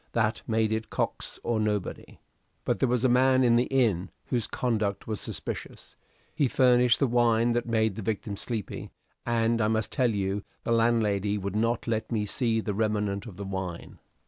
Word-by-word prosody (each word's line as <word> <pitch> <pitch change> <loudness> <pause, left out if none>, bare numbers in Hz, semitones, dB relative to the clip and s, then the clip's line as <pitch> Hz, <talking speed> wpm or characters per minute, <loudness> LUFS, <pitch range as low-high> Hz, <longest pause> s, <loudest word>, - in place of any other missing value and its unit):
That 110 0 +1
made 110 -1 +1
it 110 0 -2
Cox - - -3
or 115 -2 0
nobody. 105 -2 -3 0.5
But - - 0
there 130 - +2
was 125 0 +1
a - - +7
man 130 +1 +4
in 120 -1 +5
the 120 +1 +3
inn 110 -9 +1 0.2
whose 120 -5 -1
conduct 110 -5 -1
was 110 -2 -4
suspicious. - - -6 0.4
He 145 - +2
furnished 125 -1 +4
the 140 - +3
wine 120 -1 +3
that 120 0 -1
made 110 -2 +1
the 110 - -6
victim 105 0 -3
sleepy 110 -1 -4 0.4
and 115 0 +2
I 105 - +3
must 110 0 0
tell 130 -4 +2
you 100 -1 -1 0.2
the - - -2
landlady 105 -3 +2
would 100 0 -4
not 115 +2 0
let 110 -1 -2
me 105 -3 0
see 115 +2 0
the 105 - -3
remnant 105 -1 -1
of 95 -5 -10
the 100 - -5
wine. 95 -3 -5
110 Hz, 185 wpm, -27 LUFS, 105-120 Hz, 0.5 s, a